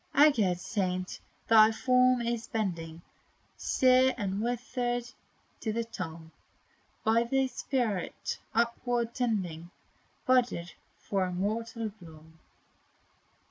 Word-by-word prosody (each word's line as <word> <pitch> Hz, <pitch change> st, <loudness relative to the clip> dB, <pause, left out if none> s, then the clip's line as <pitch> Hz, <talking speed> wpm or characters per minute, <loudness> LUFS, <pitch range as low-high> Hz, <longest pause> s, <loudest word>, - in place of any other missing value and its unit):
Aged 225 Hz, -, +5 dB
saint, 185 Hz, -2 st, -2 dB, 0.3 s
thy 220 Hz, -1 st, +7 dB
form 250 Hz, +1 st, +3 dB
is 230 Hz, -1 st, -2 dB
bending, 170 Hz, -6 st, -3 dB, 0.5 s
Sere 255 Hz, 0 st, +3 dB
and 200 Hz, -2 st, -2 dB
withered, 245 Hz, +1 st, -1 dB, 0.6 s
to 220 Hz, -, -2 dB
the 230 Hz, +2 st, -1 dB
tomb; 165 Hz, -7 st, -7 dB, 0.7 s
But 230 Hz, +2 st, +2 dB
thy 270 Hz, 0 st, +2 dB
spirit, 245 Hz, -6 st, -2 dB, 0.2 s
upward 235 Hz, 0 st, 0 dB
tending, 185 Hz, -9 st, -2 dB, 0.6 s
Budded 245 Hz, -10 st, +2 dB, 0.3 s
for 195 Hz, -2 st, -1 dB
immortal 220 Hz, +5 st, -2 dB
bloom. 160 Hz, -1 st, -15 dB
225 Hz, 95 wpm, -30 LUFS, 185-245 Hz, 0.7 s, thy